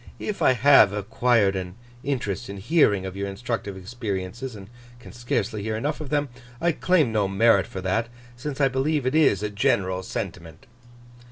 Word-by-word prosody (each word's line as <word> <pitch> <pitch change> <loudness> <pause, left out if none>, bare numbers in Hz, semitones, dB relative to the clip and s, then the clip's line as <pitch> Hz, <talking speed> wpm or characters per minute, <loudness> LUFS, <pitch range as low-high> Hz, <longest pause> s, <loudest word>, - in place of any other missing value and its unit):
If 210 - -5
I - - +5
have 125 -4 +6
acquired 105 0 +1
an 90 -1 -5 0.3
interest 120 -6 -3
in 100 - -6
hearing 105 - +2
of 95 0 -6
your 100 0 -3
instructive 100 -1 -4
experiences, 110 +3 -5
and 95 -2 -10 0.3
can 120 - -12
scarcely 115 -3 -2
hear 110 +1 -2
enough 145 +7 -2
of 150 - -6
them, 145 -1 0 0.3
I 170 +1 +2
claim 160 -6 +2
no 105 -3 +1
merit 110 +4 +3
for 100 -5 -7
that, 110 +6 -1 0.3
since 135 +3 -6
I 140 - +4
believe 135 +2 0
it 130 - 0
is 145 - +3
a 105 - -1
general 100 -5 +1
sentiment. 80 - -6
115 Hz, 175 wpm, -24 LUFS, 95-135 Hz, 0.3 s, have